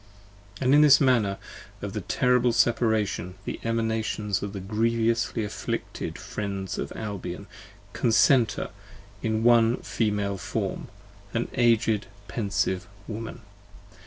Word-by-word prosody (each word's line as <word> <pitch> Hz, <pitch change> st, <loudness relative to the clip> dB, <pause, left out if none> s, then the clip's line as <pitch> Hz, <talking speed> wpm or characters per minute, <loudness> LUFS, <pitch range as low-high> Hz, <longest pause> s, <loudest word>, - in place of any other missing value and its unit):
And 130 Hz, +1 st, +3 dB
this 145 Hz, -2 st, +8 dB
the -, -, +1 dB
manner 110 Hz, -7 st, +2 dB, 0.5 s
of -, -, -4 dB
the -, -, -3 dB
terrible 125 Hz, -1 st, +2 dB
Separation. 110 Hz, -7 st, +1 dB
The -, -, -4 dB
Emanations 110 Hz, -3 st, -1 dB
of 100 Hz, -, -4 dB
the 100 Hz, -, -5 dB
grievously 115 Hz, +3 st, 0 dB
afflicted 105 Hz, -, -4 dB
Friends 100 Hz, -2 st, -4 dB
of -, -, -4 dB
Albion 100 Hz, -5 st, -5 dB, 0.5 s
Concenter 120 Hz, +1 st, +3 dB, 0.5 s
in 110 Hz, 0 st, 0 dB
one 120 Hz, 0 st, +5 dB
Female 105 Hz, -3 st, -1 dB
form, -, -, -3 dB, 0.5 s
an 115 Hz, -, 0 dB
Aged 115 Hz, -4 st, +2 dB, 0.2 s
pensive 100 Hz, -4 st, -1 dB, 0.2 s
Woman. 115 Hz, +2 st, -6 dB
110 Hz, 110 wpm, -26 LUFS, 100-115 Hz, 0.5 s, this